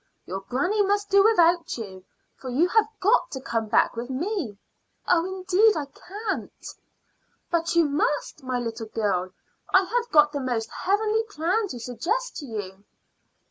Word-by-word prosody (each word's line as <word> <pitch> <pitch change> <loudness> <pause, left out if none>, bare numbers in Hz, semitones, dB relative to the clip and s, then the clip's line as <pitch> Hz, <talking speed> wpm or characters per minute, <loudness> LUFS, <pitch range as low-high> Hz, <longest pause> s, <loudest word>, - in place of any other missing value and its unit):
"Your 190 +2 -4
granny 355 - 0
must 405 0 0
do 395 0 +6
without 350 - +3
you, 190 -5 -8 0.3
for 260 - -8
you 290 +8 +2
have 440 +2 +3
got 475 +5 +3
to 265 - -5
come 230 -4 -2
back 215 - +3
with 235 +2 -5
me." 285 - -3 0.5
"Oh, 340 -2 +4
indeed, 380 +3 +2
I 295 - -2
can't!" 395 +8 -5 1.0
"But 335 0 0
you 335 -1 +5
must, 295 +1 -1
my 255 -1 -2
little 230 -2 -4
girl. 195 -5 -1 0.4
I 375 - +6
have 475 +5 -1
got 300 -1 +6
the 290 - -3
most 240 -4 -2
heavenly 425 +3 +1
plan 400 +3 -1
to 250 -9 -7
suggest 370 - -2
to 290 - -7
you." 200 -4 -6
330 Hz, 160 wpm, -25 LUFS, 240-400 Hz, 1.0 s, do